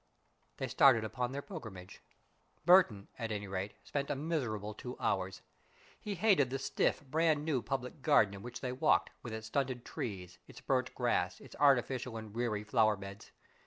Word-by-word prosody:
They - - -2
started 125 -5 +5
upon 125 +3 -2
their 140 +1 -4
pilgrimage. 105 - -9 0.6
Burton, 170 - +5
at 115 -2 -3
any 105 -1 -3
rate, 95 +1 -4
spent 140 -1 -3
a - - 0
miserable 125 - -2
two 125 +4 -7
hours. 95 -1 -1 0.6
He 205 -1 -4
hated 180 - +4
the 135 - -2
stiff, 135 +2 0
brand 155 +1 +2
new 145 -6 +1
public 135 +3 -4
garden 115 -9 +4
in 100 - -8
which 120 +2 -7
they 125 - -2
walked, 125 - +2
with 120 - -7
its 110 0 -5
stunted 125 +1 -2
trees, 90 -5 -6
its - - -12
burnt - - 0
grass, - - 0
its - - -13
artificial 130 -3 +3
and 110 -2 -8
weary 115 -3 -1
flower 110 0 +3
beds. 100 0 -10
120 Hz, 170 wpm, -33 LUFS, 105-140 Hz, 0.6 s, started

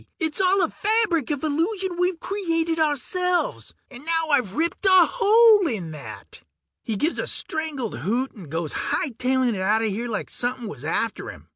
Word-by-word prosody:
It's 320 +1 -1
all 380 0 +3
a 330 - 0
fabric 420 - +2
of 290 -2 -3
illusion 350 +5 -1
we've 360 -1 0
created 330 -5 -1
ourselves! 350 +4 -1 0.2
And 265 +1 -11
now 325 0 0
I've 245 -9 +1
ripped 335 +5 -1
a 375 -2 +7
hole 440 -3 +5
in 190 - -4
that!" 150 -3 -9 0.4
He 225 - -4
gives 305 - -1
a - - -2
strangled 305 -7 -2
hoot 245 +7 -1
and 185 - -12
goes 160 0 -3
hightailin' 255 -2 0
outta 215 +4 +2
here 220 +3 -2
like 215 - -4
somepin' 245 -1 -2
was 140 -9 -8
after 210 +8 -2
him. - - -13
305 Hz, 165 wpm, -23 LUFS, 230-360 Hz, 0.4 s, a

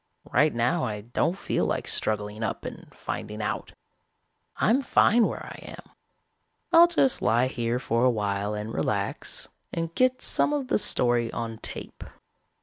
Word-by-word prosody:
Right 150 0 +4
now 125 +9 0
I 105 -4 -3
don't 150 - -1
feel - - -1
like - - -2
struggling 105 0 -2
up 110 - -3
and - - -8
finding 105 +1 -6
out. 105 - -3 0.8
I'm 245 +5 +2
fine 235 -3 +4
where - - -6
I - - -9
am. - - -11 0.8
I'll 340 0 +8
just 300 -7 +2
lie 120 +3 +3
here 120 -2 -1
for 115 -1 0
a 130 - +5
while 105 -2 -1
and 105 +2 -5
relax, 100 -1 -2 0.2
and 165 0 -3
get 255 +3 +2
some 295 - +2
of 275 -3 -2
the - - +3
story 120 - +3
on 115 -1 -5
tape. - - -5
120 Hz, 155 wpm, -26 LUFS, 110-180 Hz, 0.8 s, I'll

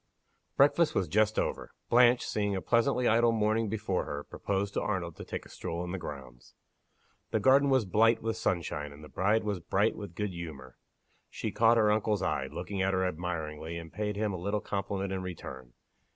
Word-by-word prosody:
BREAKFAST 150 +4 +4
was 95 - +1
just 110 +5 +2
over. - - -1 0.2
Blanche, 120 0 +5
seeing 105 -1 -1
a - - -1
pleasantly 125 +1 +2
idle 115 +1 +4
morning 110 0 +1
before 100 -3 -1
her, 75 0 -5
proposed 100 +4 -3
to - - 0
Arnold 90 -5 -2
to - - -7
take - - -6
a - - -14
stroll 85 +1 -4
in 90 - -5
the 95 - -3
grounds. 65 -6 -9 0.7
The 110 - +1
garden 135 +5 +5
was 130 -5 +3
blight 110 +4 +4
with 115 0 -2
sunshine, 75 -4 -2
and 75 +2 -13
the 75 - -11
bride 100 - +1
was 105 -3 -2
bright 100 +6 +1
with 100 -5 -8
good 105 0 -2
humor. 75 -8 -8 0.5
She - - -4
caught 115 +1 +4
her 105 -2 +4
uncle's 105 -2 +1
eye, - - 0
looking 100 -2 -4
at 95 0 +1
her 95 0 +1
admiringly, 80 -2 -4
and 85 -1 -9
paid 105 0 -2
him 105 -1 -1
a - - -3
little 100 +3 0
compliment 100 -1 -3
in 95 - -2
return. 65 -9 -8
100 Hz, 195 wpm, -30 LUFS, 85-110 Hz, 0.7 s, Blanche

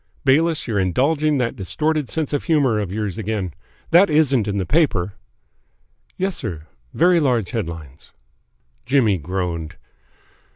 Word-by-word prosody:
"Bayliss, 155 +4 +2
you're 110 -4 0
indulging 145 - +1
that 125 -3 -1
distorted 150 - -1
sense 155 -3 -2
of 145 - -1
humour 140 -10 +2
of 100 -4 -3
yours 105 0 -3
again. 100 -5 -3 0.4
That 175 +3 +6
isn't 140 -8 +2
in 100 -1 -1
the 95 - -1
paper?" 105 - +1 1.0
"Yes, 190 -1 -1
sir. 90 - -4 0.3
Very 175 +1 +3
large 125 - 0
headlines." 80 - -6 0.7
Jimmy 120 -7 +2
groaned. 85 -1 -4
115 Hz, 130 wpm, -21 LUFS, 95-150 Hz, 1.0 s, That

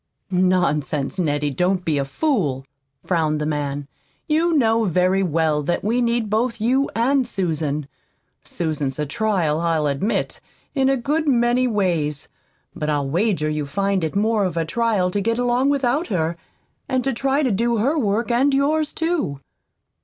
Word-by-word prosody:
"Nonsense, 180 -4 +1
Nettie, 145 -3 0
don't 180 +6 0
be 150 -3 +1
a 140 - -1
fool," 145 - -1 0.4
frowned 155 -4 +1
the 150 - -2
man. 145 -2 -3 0.4
"You 320 +1 +2
know 225 -3 +3
very 185 +1 +2
well 160 -4 +1
that 160 +4 -1
we 230 +4 +1
need 235 -2 +1
both 230 +3 0
you 260 +5 +1
and 255 +3 +2
Susan. 155 - -2 0.6
Susan's 150 -5 -3
a 150 - -1
trial, 170 -2 0
I'll 165 -3 +1
admit, 145 +10 -1 0.3
in 270 -2 +2
a 270 - +2
good 300 +6 -1
many 245 -1 +3
ways; 170 - -1 0.5
but 150 - -3
I'll 145 -2 0
wager 175 -3 +1
you'd 150 -2 -2
find 195 +3 0
it 160 - -2
more 215 +1 +2
of 180 -3 -2
a 165 - +1
trial 210 -1 0
to 205 - -1
get 230 +3 0
along 245 +2 +2
without 280 +2 +1
her, 170 -4 -1 0.5
and 255 0 0
try 275 +4 +1
to 255 - +1
do 230 +3 +1
her 265 +9 +1
work 230 -3 0
and 270 +4 +3
yours, 300 +2 +1
too." 325 - -1
195 Hz, 160 wpm, -21 LUFS, 155-245 Hz, 0.6 s, know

